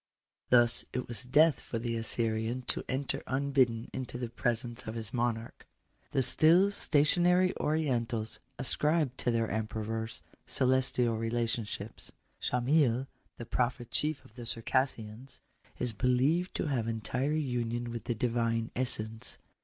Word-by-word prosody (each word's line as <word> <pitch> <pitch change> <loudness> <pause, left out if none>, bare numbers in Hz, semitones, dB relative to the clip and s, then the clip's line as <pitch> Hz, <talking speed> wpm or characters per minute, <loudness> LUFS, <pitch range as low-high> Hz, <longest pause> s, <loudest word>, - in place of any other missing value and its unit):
Thus 120 -1 +6
it 125 0 -3
was 120 +1 0
death 150 +5 +4
for 115 - -5
the 115 0 -2
Assyrian 115 +1 0
to - - -1
enter 135 +1 -2
unbidden 130 -4 +1
into 130 -2 -5
the 120 -1 -4
presenoe 120 0 -1
of 110 - -4
his 110 -1 -1
monarch. 120 -2 -2 0.4
The 135 - +1
still 170 +9 +4
stationary 180 +3 +3
Orientals 120 -8 -1 0.2
ascribe 150 +1 0
to - - -1
their 115 -1 +1
emperors 110 +1 -3 0.2
celestial 125 -3 +1
relationships. 115 -1 -3 0.3
Sohamyl, 125 0 +2 0.3
the 120 - -7
prophet 120 0 -2
chief 150 -1 +1
of - - -18
the 120 -1 -5
Circassians, 115 0 -1 0.4
is 125 -2 -1
believed 130 - +1
to - - -1
have 130 -7 -1
entire 115 +6 -1
union 120 -4 -2
with 115 -1 -6
the 120 - -1
Divine 115 -1 0
essence. 115 -3 0
120 Hz, 130 wpm, -31 LUFS, 115-135 Hz, 0.4 s, Thus